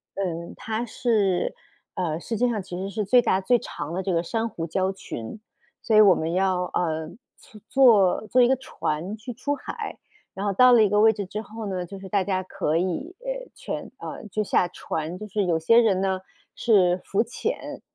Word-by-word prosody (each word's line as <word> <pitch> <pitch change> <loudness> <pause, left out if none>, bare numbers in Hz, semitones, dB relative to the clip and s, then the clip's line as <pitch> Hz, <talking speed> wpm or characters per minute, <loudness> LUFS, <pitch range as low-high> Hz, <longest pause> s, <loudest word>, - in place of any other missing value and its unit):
嗯， 170 -3 -3
它 225 +2 -3
是， 215 -6 +1 0.4
呃， 165 -3 -1
世 225 +6 -4
界 245 +1 +2
上 215 -3 -1
其 180 -1 -7
实 195 +1 -4
是 210 0 -2
最 245 +5 +5
大 190 - +2
最 245 +5 +3
长 165 - -6
的 190 +1 -2
这 190 - -1
个 165 - +2
珊 225 +5 -1
瑚 165 -4 -5
礁 190 +3 0
群， 185 - -7 0.4
所 220 - +1
以 215 - +9
我 195 -3 +7
们 160 +1 -2
要， 185 -1 +1
呃， 160 -2 -1 0.6
坐 220 -8 +5
坐 250 +4 +4
一 240 - +6
个 265 - +3
船 185 -6 -3
去 235 +3 -7
出 285 +5 -2
海， 430 +8 -6 0.4
然 195 +2 -4
后 200 - +1
到 250 +4 +7
了 225 - +7
一 210 - +3
个 210 +1 +3
位 220 +1 +6
置 205 - -4
之 210 +3 -5
后 220 +1 -8
呢， 185 -2 -3
就 195 +3 -9
是 190 0 -10
大 200 -2 +2
家 185 -2 -1
可 185 -5 -2
以 190 - -2 0.4
全， - - -6
呃， - - -7
就 210 +3 -1
下 180 -2 +2
船， 165 0 -5
就 215 +1 -8
是 205 -1 -1
有 170 -2 +2
些 230 +9 +4
人 200 -5 +3
呢 190 -1 0 0.4
是 185 -6 +3
浮 200 +3 +1
潜， - - -4
195 Hz, 220 characters per minute, -25 LUFS, 180-225 Hz, 0.6 s, 以